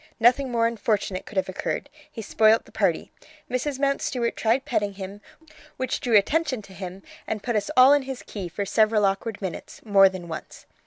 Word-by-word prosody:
Nothing 250 +4 +4
more 230 -1 +2
unfortunate 210 -4 -1
could 215 - -9
have 190 - +1
occurred; 185 - -3 0.2
he 225 -6 -7
spoilt 220 +2 +3
the - - -18
party. - - 0 0.4
Mrs. 260 +2 -1
Mountstuart 270 -3 -1
tried 235 +4 +1
petting 205 -4 -1
him, 195 +1 -8 0.6
which 260 - -2
drew 240 -6 +4
attention 260 +2 +1
to 195 - -14
him, 185 0 -8 0.2
and 215 -2 -3
put 240 -2 -1
us 205 -1 0
all 255 +2 +8
in 290 - +4
his 265 -1 -7
key 195 -4 -6
for 200 +4 -4
several 215 +1 +3
awkward 195 +2 -1
minutes, 185 -3 -6
more 195 -2 +6
than 185 -2 -8
once. 160 -2 -8
220 Hz, 190 wpm, -25 LUFS, 195-250 Hz, 0.6 s, all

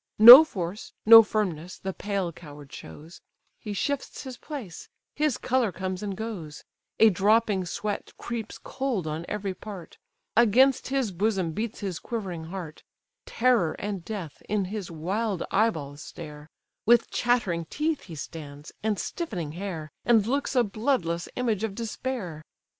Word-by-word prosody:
No 240 +7 +13
force, 190 - -6
no 225 +1 +11
firmness, 185 -6 -3
the 190 0 -5
pale 195 -3 -2
coward 145 -4 -13
shows; 150 - -11 0.4
He 210 - -7
shifts 285 +7 -3
his 260 -2 -7
place: 245 - -8 0.2
his 300 -3 0
colour 250 -5 0
comes 185 +1 -4
and 200 -2 -4
goes: 195 -9 -6 0.4
A 220 -1 +7
dropping 205 0 +2
sweat 205 +4 -4
creeps 230 -2 -5
cold 260 -10 -3
on 155 +2 -4
every 200 -2 -3
part; 190 -2 -10 0.4
Against 245 +4 +4
his 265 -5 -1
bosom 190 -2 0
beats 220 +6 -4
his 190 -5 -4
quivering 185 -8 -5
heart; 170 -3 -7 0.5
Terror 230 -9 +2
and 200 -4 -5
death 185 -7 -7
in 205 -2 0
his 205 -4 -5
wild 190 +5 -2
eye 220 +3 +4
balls 145 -6 -7
stare; 150 -3 -10 0.3
With 235 +1 +4
chattering 210 -9 0
teeth 305 - -2
he 165 - -9
stands, 145 0 -9
and 215 -1 0
stiffening 185 - -4
hair, 165 -3 -6
And 225 -3 +4
looks 275 +3 -1
a 250 - +5
bloodless 205 -6 -1
image 225 -5 -1
of 215 -3 -3
despair! 225 -7 -4
200 Hz, 145 wpm, -26 LUFS, 170-230 Hz, 0.5 s, No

